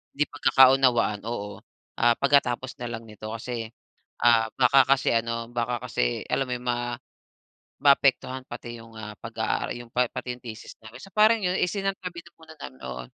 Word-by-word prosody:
'di 150 - +2
pagkakaunawaan, 130 -6 +4
oo, 105 -3 -5 0.4
ah, 120 0 +4
pagkatapos 130 -2 +2
na 120 - -3
lang 115 0 -6
nito." 110 0 -9
Kasi, 115 -1 -5 0.6
ah, 115 -2 +5
baka 135 +1 +6
kasi 135 0 +3
ano, 115 0 -1
baka 120 0 -2
kasi, - - -1
alam 135 - 0
mo - - -1
yun, 125 0 -9
ma 120 0 -1 0.9
maapektuhan 135 -2 +3
pati 120 -1 -8
yung 115 0 -15
ah, 105 -1 -7
pag-aara - - -2
yung 120 -1 -11
pa 125 0 +2
pati 125 - -5
yung 125 - -20
thesis 110 -1 -9
namin. 110 +3 -11
So 195 - -12
parang 215 +1 +5
yun, 180 +1 +1
isinantabi 190 -2 -2
na 170 - -17
muna 160 -1 -13
namin 65 0 -9
oo. 65 -1 -6
120 Hz, 175 wpm, -26 LUFS, 115-135 Hz, 0.9 s, baka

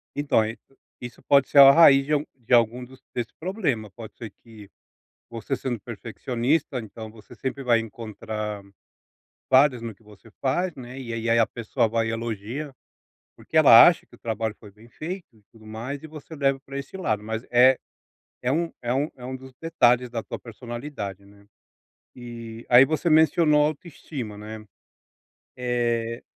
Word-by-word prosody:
Então 145 -6 +2
é 110 +2 -4 0.5
isso 120 -2 -9
pode 140 -2 +3
ser - - -1
a 135 0 +11
raiz 140 -4 +7
de 150 - -1
algum 150 0 +1
de 120 0 -3
algum 120 +1 +3
dos 130 +1 -17
desse 120 -1 -4
problema, 155 - -2
pode 110 0 -11
ser 110 -4 -8
que 110 -3 -14 0.6
você 115 +3 -4
sendo 120 -5 -4
perfeccionista, 125 +6 -2
então 110 +1 -9
você 110 -1 -15
sempre 135 +1 -5
vai 120 -2 +3
encontrar 110 -2 -6 0.9
falhas 130 -2 +4
no 115 -2 -6
que 110 - -29
você 105 +1 -18
faz, 170 +6 0
né, 125 0 -9
e 120 -3 -6
ei 115 - -4
e 115 - 0
aí 115 - +4
a 115 - +4
pessoa 115 -1 -1
vai 115 0 0
e - - -1
elogia, 115 +5 -5 0.6
porque - - -8
ela - - +9
acha - - +2
que - - -21
o - - -28
trabalho 110 -1 -3
foi 105 - -13
bem 110 +3 -19
feito 175 +8 -7
e 105 - -25
tudo 110 -1 -17
mais, 120 +7 -6
e - - -8
você 155 +1 -11
leva 135 -1 +1
pra 135 +1 -7
esse 140 +7 -8
lado, 110 - -1
mas 110 +2 -5
é 125 +2 +6 0.6
é 125 - 0
um 170 +2 0
é 120 0 -1
um 145 +4 0
é 125 - -12
um 130 +1 -5
dos 130 0 -13
detalhes 125 -7 +2
da 115 -2 -4
tua - - -7
personalidade, 120 -4 -7
né, 100 0 -20 0.7
eh, 115 -2 -9
aí 125 +2 +8
você 160 +2 -1
mencionou 155 -1 +4
autoestima, 145 - -6
né, 110 +1 -9 0.9
eh 120 -2 -1
120 Hz, 180 wpm, -24 LUFS, 110-140 Hz, 0.9 s, a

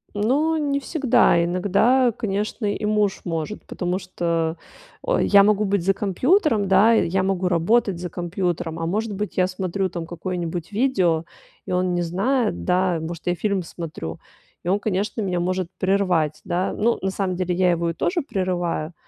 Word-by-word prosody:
Ну 290 +10 +1
не 285 -2 0
всегда. 255 - +3
Иногда, 205 +8 +3
конечно, 210 +1 -3
и 205 +1 -2
муж 210 -2 +1
может, 165 +4 -4
потому 180 0 -2
что, 170 -3 -2 0.4
о, - - 0
я 200 -1 +6
могу 210 0 +3
быть 200 -3 0
за 195 - +4
компьютером, 215 - +2
да. 195 +4 +5
Я 190 -3 +2
могу 190 -1 0
работать 180 +2 +2
за 180 -1 -5
компьютером, 175 -2 -3
а, 165 - -2
может 210 +4 -1
быть, 205 0 -4
я 185 - +3
смотрю 185 +1 -2
там 170 -1 -5
какое-нибудь 175 0 -4
видео, 185 -10 +1 0.4
и - - -6
он 180 0 +1
не 175 - 0
знает, 190 - 0
да, 180 -2 +2
может, 165 +2 -7
я 175 - +2
фильм 200 -1 -1
смотрю, 155 - -7 0.4
и - - -8
он, 195 +3 +2
конечно, 205 +2 -2
меня 180 -3 -1
может 185 0 -1
прервать, 180 -6 +1
да. 180 +2 -1
Ну, 230 +2 +1
на 190 - 0
самом 190 -2 -2
деле 180 -1 -1
я 180 -1 +3
его 170 0 0
и - - -2
тоже 350 - 0
прерываю. 180 - -2
185 Hz, 175 wpm, -23 LUFS, 175-210 Hz, 0.4 s, я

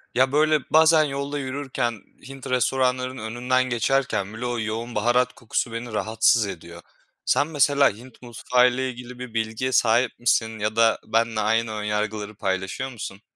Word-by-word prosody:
ya 130 +1 +3
böyle 155 +1 +3
bazen 160 0 +5
yolda 140 0 -3
yürürken 130 -5 -3 0.3
Hint 135 -1 -9
restoranlarının 130 0 0
önünden 125 +3 0
geçerken 120 -4 -1
bile 115 +3 -6
o 120 -1 -2
yoğun 110 +2 -4
baharat 120 +3 +2
kokusu 120 +1 -3
beni 115 0 -6
rahatsız 110 0 +2
ediyor. 85 -2 -9 0.4
Sen 145 - +2
mesela 145 -2 +3
Hint 125 +3 -15
mutfağıyla 125 +1 +1
ilgili 125 -1 -7
bir 125 -2 -8
bilgiye 115 +3 -2
sahip 120 0 +2
misin 110 -2 +1
ya 105 +1 -2
da 115 -1 +3
benle 115 0 0
aynı 110 +1 +1
ön 105 -1 -4
yargıları 105 0 -3
paylaşıyor 95 +6 -3
musun? 105 -5 -8
120 Hz, 155 wpm, -24 LUFS, 110-130 Hz, 0.4 s, bazen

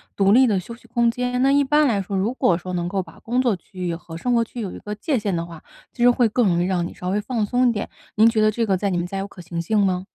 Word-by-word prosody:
独 195 0 +3
立 255 +3 +6
的 205 -4 +1
休 215 +6 -9
息 240 - -21
空 235 0 +2
间。 250 +1 -2
那 270 - +4
一 285 0 +4
般 295 +2 +3
来 210 -6 +1
说， 195 +1 -3
如 205 +6 0
果 245 -10 +2
说 180 +1 -7
能 175 -1 -1
够 190 +1 -2
把 165 - -16
工 245 +2 -1
作 245 -5 +2
区 185 +1 -19
域 170 - -1
和 165 -1 -8
生 245 +8 -1
活 235 -1 +3
区 235 +1 -9
域 - - -2
有 190 - -4
一 - - -9
个 210 0 -6
界 255 +5 -1
限 200 -3 -1
的 165 0 -2
话， 170 -2 -11 0.3
其 245 - -8
实 245 - +7
会 245 -1 +3
更 230 +1 +2
容 175 -2 +2
易 - - 0
让 180 -2 0
你 - - -10
稍 180 - -5
微 205 +3 0
放 225 -1 -1
松 250 +3 +2
一 - - +3
点。 210 -3 -3 0.3
您 220 +2 +6
觉 225 -1 +2
得 215 - +5
这 230 +2 -1
个 195 -3 +2
在 200 +2 -1
你 180 - -1
们 175 - -1
家 195 +2 -4
有 195 - -4
可 195 - -16
行 170 -1 -5
性 215 +6 0
吗？ 190 -1 +1
210 Hz, 365 characters per minute, -22 LUFS, 180-240 Hz, 0.3 s, 实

